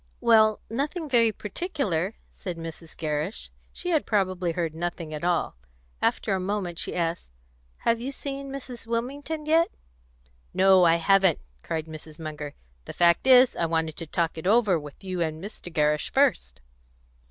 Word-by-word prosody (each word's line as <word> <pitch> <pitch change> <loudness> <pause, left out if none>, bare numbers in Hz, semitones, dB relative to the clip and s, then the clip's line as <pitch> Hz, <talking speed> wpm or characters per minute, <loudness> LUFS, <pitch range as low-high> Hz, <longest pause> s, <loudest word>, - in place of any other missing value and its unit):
"Well, 220 -2 +5
nothing 295 - -3
very 235 -4 +4
particular," 210 - -2 0.2
said 180 -3 -6
Mrs. 165 0 -9
Gerrish; 155 +5 -3 0.2
she 355 - -4
had 315 -3 +1
probably 185 -4 0
heard 165 -2 -2
nothing 170 -1 -4
at 150 - -5
all. 175 - 0 0.4
After - - +1
a 190 - 0
moment 185 -2 -2
she - - -2
asked, 170 - -2 0.6
"Have 230 0 +2
you 265 +3 -3
seen 275 0 -6
Mrs. 255 -4 -8
Wilmington 280 +7 -3
yet?" 325 +2 +4 0.9
"No, 190 -1 +6
I 165 0 +5
haven't," 190 0 +4 0.2
cried 160 - -3
Mrs. 155 -1 -10
Munger. 150 -2 -6 0.3
"The - - -7
fact 170 +7 +3
is, 255 -1 +7
I 170 - 0
wanted 160 -1 -1
to 165 - -4
talk 165 +1 -1
it 160 - -4
over 210 -5 +4
with 145 +4 -12
you 185 -2 -3
and 160 -1 -1
Mr. 190 -1 -8
Gerrish 150 -1 +1
first." 60 0 +1
180 Hz, 160 wpm, -26 LUFS, 160-230 Hz, 0.9 s, is